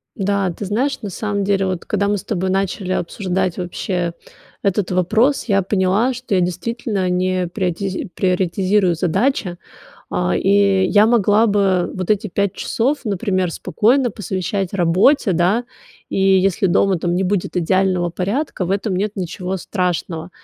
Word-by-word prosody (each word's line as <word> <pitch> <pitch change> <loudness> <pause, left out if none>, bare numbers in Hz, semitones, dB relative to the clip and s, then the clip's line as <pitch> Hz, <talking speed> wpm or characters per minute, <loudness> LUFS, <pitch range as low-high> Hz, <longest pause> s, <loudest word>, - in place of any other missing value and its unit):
Да, 200 -2 0
ты 200 - -6
знаешь, 255 +8 -1
на 210 - -5
самом 205 +1 -2
деле, 195 -1 +1
вот, 185 -2 -3
когда 200 -1 0
мы 205 - +1
с - - -7
тобой 190 -3 -2
начали 190 0 -1
обсуждать 185 0 -2
вообще 180 -1 -3 0.5
этот 200 -1 0
вопрос, 215 +10 +2
я 195 -4 +2
поняла, 195 +6 +1
что 250 -4 -3
я 185 - +3
действительно 190 +2 -2
не 185 0 0
приотиз 185 +1 -3
приоритизирую 185 +1 +1
задачи, 185 - 0 0.5
а. 180 0 0
И 195 -1 +3
я 205 +3 +5
могла 220 -1 +4
бы 195 -3 +1
вот 185 -2 -4
эти 210 +1 +1
5 200 +1 0
часов, 275 +5 -1
например, 190 -3 -1
спокойно 240 - +1
посвящать 190 -1 -3
работе, 195 - +3
да, 180 +8 +2 0.4
и - - -3
если 195 +1 +3
дома 190 +1 +2
там 175 +1 -1
не 190 - +1
будет 190 -1 -1
идеального 185 0 +1
порядка, 195 - -2
в 175 - -4
этом 200 0 -1
нет 200 +3 -1
ничего 185 0 -4
страшного. 180 -2 -3
190 Hz, 155 wpm, -19 LUFS, 180-205 Hz, 0.5 s, я